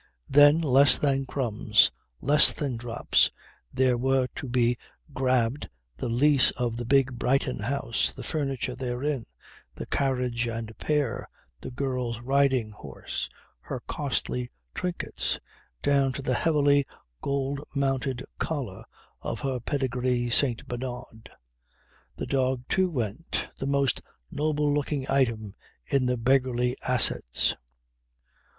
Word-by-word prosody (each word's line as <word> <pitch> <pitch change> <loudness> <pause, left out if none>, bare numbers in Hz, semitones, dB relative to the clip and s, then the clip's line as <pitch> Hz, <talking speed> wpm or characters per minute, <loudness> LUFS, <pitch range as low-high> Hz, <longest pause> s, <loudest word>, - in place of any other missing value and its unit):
Then, 145 +3 +7
less 140 -2 +6
than 135 -2 +1
crumbs, 115 -5 +3 0.3
less 150 +2 +5
than 140 -4 -3
drops, 115 0 +2 0.4
there 130 -2 +2
were 130 0 +2
to 135 - -6
be 120 -1 +2 0.4
grabbed, 130 0 +1 0.3
the 115 - -3
lease 135 +3 +4
of 120 -3 -1
the 120 - -4
big 130 -2 +2
Brighton 130 -1 +1
house, 115 +1 -1
the - - -9
furniture 135 -4 -2
therein, 125 +1 -3 0.5
the - - -6
carriage 125 -3 0
and 115 -1 -5
pair, 145 -7 -1 0.3
the - - -7
girl's 125 -3 -2
riding 130 -3 +2
horse, 105 - -6 0.3
her - - -6
costly 60 0 -2 0.2
trinkets; 180 -1 -2 0.5
down 140 -2 +3
to 135 - -6
the 130 - 0
heavily 145 0 +3 0.4
gold 140 0 -1
mounted 135 -2 0 0.2
collar 130 -12 -3 0.4
of - - -4
her 135 -2 -1
pedigree 125 -2 -1
St. 125 -2 +2
Bernard. 120 -2 -6 0.9
The - - -4
dog 130 -2 0
too 185 -1 +2
went: 125 - -3
the 135 - -2
most 140 -2 +1 0.3
noble 150 -1 +1
looking 145 -1 -1
item 115 -7 +1 0.3
in 135 -2 +1
the 125 0 +1
beggarly 125 0 +2
assets. 120 - +2
130 Hz, 120 wpm, -27 LUFS, 120-140 Hz, 0.9 s, Then